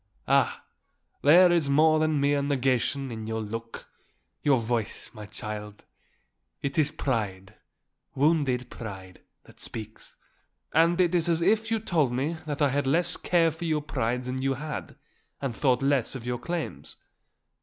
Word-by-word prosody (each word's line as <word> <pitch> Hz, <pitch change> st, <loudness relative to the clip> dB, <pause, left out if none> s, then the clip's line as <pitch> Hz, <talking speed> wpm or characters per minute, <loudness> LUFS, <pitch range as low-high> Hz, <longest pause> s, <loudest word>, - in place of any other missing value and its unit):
"Ah, -, -, +2 dB, 0.6 s
there 175 Hz, +5 st, +7 dB
is 165 Hz, -5 st, +2 dB
more 155 Hz, +2 st, +5 dB
than 155 Hz, -1 st, +1 dB
mere 140 Hz, 0 st, +2 dB
negation 135 Hz, -1 st, 0 dB
in 110 Hz, -1 st, -6 dB
your 110 Hz, 0 st, -2 dB
look, 115 Hz, +1 st, -6 dB, 0.6 s
your 140 Hz, -3 st, +4 dB
voice, 115 Hz, -2 st, -2 dB
my 105 Hz, -3 st, -9 dB
child. 105 Hz, +1 st, -7 dB, 0.8 s
It 140 Hz, +3 st, -1 dB
is 150 Hz, -1 st, +3 dB
pride, 105 Hz, -10 st, -3 dB, 0.6 s
wounded 140 Hz, -4 st, +1 dB
pride, 95 Hz, -5 st, -9 dB, 0.2 s
that -, -, -19 dB
speaks; 110 Hz, -1 st, -7 dB, 0.6 s
and 170 Hz, +2 st, +4 dB
it 180 Hz, -1 st, +3 dB
is 175 Hz, -1 st, +2 dB
as 165 Hz, 0 st, +2 dB
if 220 Hz, +4 st, +2 dB
you 225 Hz, -, +2 dB
told 165 Hz, -, +1 dB
me 135 Hz, +6 st, -1 dB
that 145 Hz, 0 st, -1 dB
I 145 Hz, -, +4 dB
had 140 Hz, +1 st, 0 dB
less 165 Hz, +6 st, +2 dB
care 165 Hz, -2 st, +2 dB
for 160 Hz, +2 st, -7 dB
your 155 Hz, -2 st, 0 dB
pride 125 Hz, -3 st, -1 dB
than 130 Hz, +1 st, -3 dB
you 135 Hz, 0 st, 0 dB
had, 150 Hz, +3 st, -6 dB, 0.4 s
and 135 Hz, -5 st, -3 dB
thought 130 Hz, 0 st, +2 dB
less 135 Hz, -3 st, +1 dB
of 120 Hz, -3 st, -7 dB
your 125 Hz, -1 st, -2 dB
claims." 160 Hz, -, -5 dB
140 Hz, 155 wpm, -27 LUFS, 115-155 Hz, 0.8 s, there